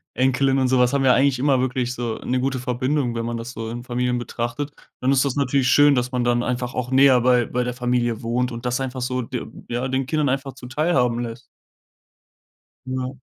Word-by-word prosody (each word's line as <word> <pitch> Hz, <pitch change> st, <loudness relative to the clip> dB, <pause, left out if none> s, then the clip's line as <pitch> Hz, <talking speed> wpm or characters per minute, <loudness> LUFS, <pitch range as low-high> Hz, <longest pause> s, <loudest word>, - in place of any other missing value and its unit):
Enkelin 135 Hz, +1 st, +2 dB
und 130 Hz, -1 st, +2 dB
so 130 Hz, 0 st, +2 dB
was 125 Hz, 0 st, +4 dB
haben 140 Hz, -1 st, +1 dB
ja 130 Hz, -, +6 dB
eigentlich 135 Hz, 0 st, +3 dB
immer 135 Hz, -1 st, +3 dB
wirklich 125 Hz, -1 st, -1 dB
so 120 Hz, -3 st, -3 dB
'ne 130 Hz, +1 st, 0 dB
gute 135 Hz, 0 st, -1 dB
Verbindung, 125 Hz, +1 st, -1 dB
wenn 115 Hz, 0 st, -2 dB
man 120 Hz, 0 st, -3 dB
das 115 Hz, +1 st, -6 dB
so 115 Hz, -2 st, -6 dB
in 120 Hz, +1 st, -6 dB
Familien 125 Hz, 0 st, -1 dB
betrachtet. 120 Hz, +4 st, -4 dB, 0.3 s
Dann 130 Hz, +2 st, +1 dB
ist 135 Hz, 0 st, +4 dB
das 140 Hz, -1 st, -1 dB
natürlich 140 Hz, -1 st, +1 dB
schön, 145 Hz, +1 st, +6 dB
dass 125 Hz, 0 st, -1 dB
man 125 Hz, -1 st, 0 dB
dann 120 Hz, 0 st, +2 dB
einfach 125 Hz, 0 st, -2 dB
auch 125 Hz, -1 st, -3 dB
näher 130 Hz, -1 st, +6 dB
bei 125 Hz, -1 st, +3 dB
bei 125 Hz, +2 st, -1 dB
der 125 Hz, 0 st, -3 dB
Familie 125 Hz, -2 st, 0 dB
wohnt 125 Hz, +2 st, 0 dB
und 120 Hz, +1 st, -7 dB
das 125 Hz, +1 st, 0 dB
einfach 130 Hz, -1 st, -4 dB
so 125 Hz, +1 st, -1 dB
de 125 Hz, 0 st, -5 dB, 0.2 s
ja, 120 Hz, +2 st, -2 dB
den 130 Hz, 0 st, -1 dB
Kindern 150 Hz, 0 st, +1 dB
einfach 135 Hz, 0 st, -2 dB
zuteilhaben 130 Hz, -2 st, 0 dB
lässt. 120 Hz, +1 st, -6 dB, 1.4 s
Genau. 130 Hz, 0 st, -4 dB
125 Hz, 215 wpm, -22 LUFS, 120-135 Hz, 1.4 s, ja